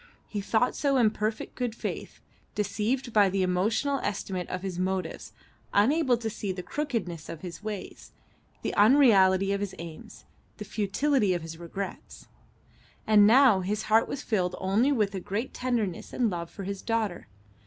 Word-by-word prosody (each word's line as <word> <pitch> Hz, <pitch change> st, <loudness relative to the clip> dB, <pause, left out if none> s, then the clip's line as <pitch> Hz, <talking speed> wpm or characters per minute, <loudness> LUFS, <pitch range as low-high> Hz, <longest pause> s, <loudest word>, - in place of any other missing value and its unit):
He 205 Hz, -, -4 dB
thought 225 Hz, +4 st, +1 dB
so 275 Hz, -2 st, +1 dB
in 225 Hz, -4 st, +4 dB
perfect 215 Hz, +1 st, -3 dB
good 245 Hz, -3 st, -3 dB
faith, -, -, -6 dB, 0.3 s
deceived 220 Hz, +5 st, -1 dB
by 205 Hz, -2 st, +5 dB
the 190 Hz, 0 st, 0 dB
emotional 215 Hz, +10 st, +1 dB
estimate 190 Hz, -3 st, -3 dB
of 185 Hz, 0 st, -4 dB
his 185 Hz, -2 st, -4 dB
motives, 185 Hz, -2 st, -3 dB, 0.4 s
unable 255 Hz, +4 st, +4 dB
to 230 Hz, -1 st, -4 dB
see 210 Hz, -2 st, -3 dB
the 180 Hz, -1 st, -5 dB
crookedness 220 Hz, -, -3 dB
of 165 Hz, -, -7 dB
his 175 Hz, -1 st, -8 dB
ways, 210 Hz, -2 st, -7 dB, 0.5 s
the -, -, -2 dB
unreality 200 Hz, -5 st, +5 dB
of 200 Hz, -, 0 dB
his 200 Hz, -2 st, -4 dB
aims, 165 Hz, -2 st, -10 dB, 0.3 s
the -, -, -7 dB
futility 215 Hz, 0 st, +1 dB
of 170 Hz, -, -4 dB
his 165 Hz, 0 st, -8 dB
regrets. 185 Hz, +3 st, -7 dB, 0.8 s
And 210 Hz, -1 st, +6 dB
now 245 Hz, -3 st, +6 dB
his 205 Hz, +3 st, -2 dB
heart 225 Hz, -, +5 dB
was 280 Hz, -, -5 dB
filled 180 Hz, -5 st, 0 dB
only 205 Hz, +9 st, +2 dB
with 210 Hz, -7 st, +1 dB
a 190 Hz, -, -3 dB
great 205 Hz, +7 st, -4 dB
tenderness 235 Hz, -8 st, -2 dB
and 235 Hz, -4 st, +1 dB
love 170 Hz, -1 st, -4 dB
for 200 Hz, -, -8 dB
his 200 Hz, 0 st, -5 dB
daughter. 220 Hz, -, -2 dB
205 Hz, 165 wpm, -28 LUFS, 185-230 Hz, 0.8 s, And